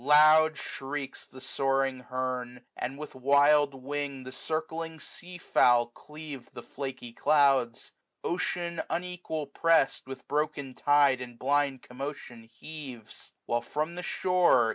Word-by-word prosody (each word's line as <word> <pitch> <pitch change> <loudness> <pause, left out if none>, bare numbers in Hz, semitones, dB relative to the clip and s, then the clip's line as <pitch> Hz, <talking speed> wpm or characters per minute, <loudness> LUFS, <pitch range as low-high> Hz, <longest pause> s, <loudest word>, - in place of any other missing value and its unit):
Loud 155 +2 +6
shrieks 135 0 -6
die - - -16
soaring 135 0 0
hernj 125 -1 -3
and 135 +3 -4
with 150 +1 -8
wild 140 +2 +4
wing 140 0 -4
The 130 - -8
circling 160 +3 -4
sea 180 +4 -9
fowl 120 -7 +4
cleave 150 -1 -10
the 120 - -8
flaky 130 -3 -6
clouds. 135 -4 +2 0.3
Qcean, 170 -1 -2
unequal 175 -3 -3
pressed, 150 -1 +2
with 135 0 -9
broken 145 -2 -1
tide 140 -2 +4
And 120 -1 -8
blind 140 0 +1
commotion 125 -2 -7
heaves; 135 -8 -10
while 120 0 0
from 155 +7 -3
the 180 - -5
shore. 180 -11 +3
140 Hz, 125 wpm, -29 LUFS, 130-155 Hz, 0.3 s, Loud